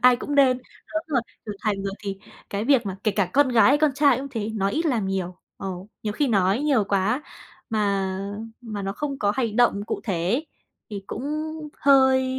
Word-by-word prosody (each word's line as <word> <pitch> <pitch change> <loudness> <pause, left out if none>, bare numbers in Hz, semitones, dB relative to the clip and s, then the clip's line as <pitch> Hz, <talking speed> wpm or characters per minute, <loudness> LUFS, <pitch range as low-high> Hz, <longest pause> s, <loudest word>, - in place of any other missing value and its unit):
ai 250 0 +7
cũng 290 +4 -4
nên 260 -3 +5 0.3
lớn 315 0 -3
rồi, 275 -6 +1 0.3
trưởng 205 -1 -5
thành 200 -2 -1
rồi 195 - -2
thì 195 -2 -5 0.3
cái 205 +2 -2
việc 255 -4 +3
mà 190 -1 -3
kể 215 - +4
cả 195 -4 0
con 280 0 +4
gái 230 -3 +5
hay 285 +2 +5
con 305 -1 +4
trai 285 -2 +4
cũng 275 +1 -5
thế, 225 -4 -3
nói 195 -1 0
ít 330 +6 0
làm 230 -9 +1
nhiều. 185 -2 -2 0.2
Ờ, 195 - -5 0.3
nhiều 210 -1 -2
khi 285 +4 0
nói 195 +2 +2
nhiều 275 -8 +2
quá 200 +8 +1 0.5
mà 200 -3 0 0.4
mà 215 -4 -5
nó 195 0 -2
không 280 +3 -4
có 205 0 +2
hành 230 -4 -1
động 210 -4 +3
cụ - - -3
thể 200 - -1
ấy 250 - 0 0.4
thì 200 -1 -5
cũng 230 - -5 0.6
hơi 265 -1 +5
220 Hz, 215 wpm, -24 LUFS, 200-270 Hz, 0.6 s, ai